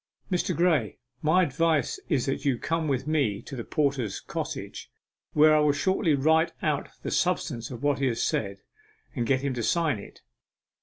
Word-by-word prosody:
Mr. 180 -1 0
Graye, 160 - +2 0.2
my 180 +5 +4
advice 155 -2 +1
is 140 -8 +1
that 135 - -2
you 135 -4 +1
come 160 +4 -1
with 135 -2 -1
me 140 -10 +1
to 135 - -8
the 120 - -5
porter's 140 -9 -1
cottage, - - -6 0.4
where 155 +1 +6
I - - +5
will 150 -1 +3
shortly 165 0 +1
write 160 +4 +3
out - - 0
the - - -3
substance 115 -1 0
of 125 0 -8
what 145 -1 +2
he 135 - +1
has 115 -2 -1
said, 100 -2 -2 0.5
and 120 -3 -1
get 130 -1 +2
him 140 -1 -1
to 120 - -3
sign 155 -1 +1
it. - - -13
145 Hz, 185 wpm, -27 LUFS, 125-160 Hz, 0.5 s, where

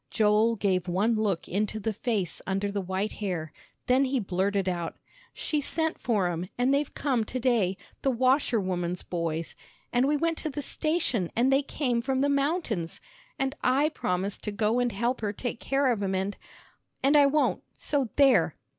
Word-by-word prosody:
Joel 215 +2 +3
gave 190 -3 0
one 195 +6 +2
look 210 -6 0
into 210 +3 -1
the 215 +1 -2
face 210 -4 -2
under 195 +1 -1
the 200 0 -2
white 190 +3 -2
hair, 175 -7 -4 0.3
then 260 +2 +4
he 265 0 0
blurted 195 0 0
out, 175 -2 -2 0.3
"She 300 -2 -2
sent 320 +2 -1
for 215 -6 +1
'em, 175 +1 -3
and 250 +3 +2
they've 285 +1 +1
come 260 -6 +1
to 255 - -4
day 225 -7 +2 0.2
the 275 - +2
washerwoman's 215 - +1
boys. 165 -2 -3 0.4
And 250 +2 +3
we 295 +1 +2
went 330 +1 0
to 310 - -3
the 290 0 -5
station, 305 - 0
and 255 +3 +3
they 270 - +4
came 255 -4 -1
from 265 +2 0
the 285 - +2
mountains. 280 - 0 0.4
And 270 +1 -1
I 275 +4 +3
promised 195 - -2
to 210 - -1
go 215 +3 +1
and 245 -1 +1
help 235 +4 -1
her 210 -2 -1
take 235 +2 -4
care 275 -1 +1
of 220 -4 -1
'em, 190 -1 0
and, 195 +2 -1 0.7
and 280 +3 +4
I 290 -1 +7
won't, 295 +2 +1
so 280 -5 -1
there!" 275 -2 +4
225 Hz, 180 wpm, -28 LUFS, 190-270 Hz, 0.7 s, I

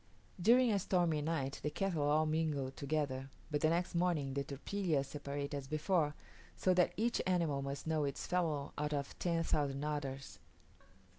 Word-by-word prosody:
During 240 +5 +6
a 200 - +2
stormy 175 -5 +1
night 145 -3 -2
the 150 - -1
cattle 185 -1 -1
all 150 +2 +3
mingle 155 -4 0
together; 140 -2 -2 0.2
but 145 -1 0
the 155 - +4
next 175 +2 0
morning 170 -6 +1
the 140 0 -1
tropillas 150 +1 -1
separate 140 0 -4
as 140 -2 -4
before; 155 0 +1 0.4
so 185 - +3
that 180 -1 +3
each 235 +3 +1
animal 165 -6 +1
must 140 0 -4
know 160 -1 +1
its 140 -1 -2
fellow 160 -6 0
out 150 0 -1
of 140 -1 -4
ten 170 -2 +1
thousand 140 -3 0
others. 140 -3 -4
150 Hz, 165 wpm, -36 LUFS, 140-170 Hz, 0.4 s, During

